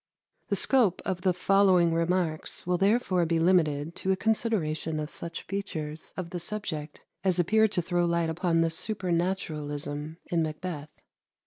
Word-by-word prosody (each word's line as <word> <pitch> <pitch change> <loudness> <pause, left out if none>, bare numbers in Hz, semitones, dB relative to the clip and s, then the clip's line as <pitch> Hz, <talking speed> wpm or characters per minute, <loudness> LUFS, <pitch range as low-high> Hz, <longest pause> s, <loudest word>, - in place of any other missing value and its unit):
The - - 0
scope 235 -10 +3
of 185 -2 -2
the 185 -1 +3
following 185 -2 +4
remarks 165 -1 -1
will 180 0 +1
therefore 195 -3 +2
be 165 0 +1
limited 165 -3 +2
to 190 - 0
a - - +3
consideration 185 -8 0
of 150 0 -4
such 170 0 -4
features 160 -6 -4
of 175 -2 -5
the 175 - -3
subject 160 -6 -5 0.2
as 185 -2 +3
appear 220 +6 +4
to 180 -4 -1
throw 175 0 +1
light 170 -1 +1
upon 165 0 +1
the 165 0 +1
supernaturalism 160 -6 -2
in 170 -1 0
"Macbeth." 155 -1 -4
175 Hz, 150 wpm, -28 LUFS, 160-190 Hz, 0.2 s, following